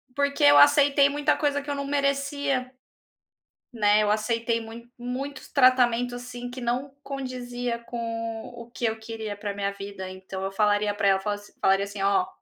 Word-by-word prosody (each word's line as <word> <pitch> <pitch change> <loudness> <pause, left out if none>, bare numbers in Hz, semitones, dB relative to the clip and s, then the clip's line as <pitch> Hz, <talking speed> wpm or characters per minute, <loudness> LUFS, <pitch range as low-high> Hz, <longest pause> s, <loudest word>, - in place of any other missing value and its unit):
porque 280 - 0
eu 145 0 +8
aceitei 280 - +6
muita 295 +1 +1
coisa 285 -1 0
que 290 - -10
eu 285 - -1
não 280 0 -3
merecia. 280 -2 -1 1.0
Né, 210 -2 +3
eu 210 - +1
aceitei 230 +2 0
muito 230 +1 -10
muitos 260 +3 -5
tratamentos, 245 -2 +4
assim, 245 0 -7
que 255 +1 -7
não 250 +3 -2
condizia 245 -3 -4
com 240 - -6 0.5
o 235 -1 -11
que 240 - -5
eu 220 0 0
queria 220 -2 -6
pra 205 -1 -4
minha 200 0 -1
vida, 200 -1 -7
então 190 0 -7
eu 195 - -2
falaria 205 +1 +2
pra 205 -1 -1
ela, 190 -1 +4
fala 205 +1 -2 0.2
falaria 195 +1 +3
assim: 200 0 -6
"Ó, 195 -2 +3
235 Hz, 175 wpm, -26 LUFS, 205-270 Hz, 1.0 s, eu